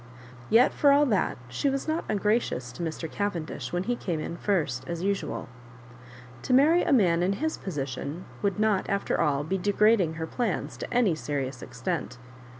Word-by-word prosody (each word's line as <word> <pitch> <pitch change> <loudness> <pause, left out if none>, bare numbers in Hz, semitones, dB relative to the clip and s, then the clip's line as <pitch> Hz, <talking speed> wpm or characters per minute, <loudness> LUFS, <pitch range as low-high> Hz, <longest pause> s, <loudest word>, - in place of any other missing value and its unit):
Yet 235 +4 +5
for 285 - +4
all 285 +1 +5
that 215 -8 +1
she 200 - 0
was 275 +2 -2
not 315 +2 -1
un 215 - +1
gracious 210 - 0
to 125 - -9
Mr. 165 0 -3
Cavendish 165 -8 -3
when 175 +1 -1
he 245 +4 0
came 175 -8 -3
in 170 - -4
first 160 -10 -1
as 170 0 -4
usual. 200 0 -2 0.9
To 250 - -1
marry 315 +6 +5
a - - 0
man 180 -10 +4
in 185 +2 +2
his 315 +9 -2
position 145 0 -5 0.2
would 200 -1 0
not, 215 -3 +1
after 200 0 0
all, 145 -3 +1
be 190 +6 -2
deranging 205 -3 +3
her 160 0 -3
plans 225 +4 -2
to - - -6
any 240 -7 +3
serious 140 -4 -3
extent. - - -4
190 Hz, 180 wpm, -27 LUFS, 160-225 Hz, 0.9 s, Yet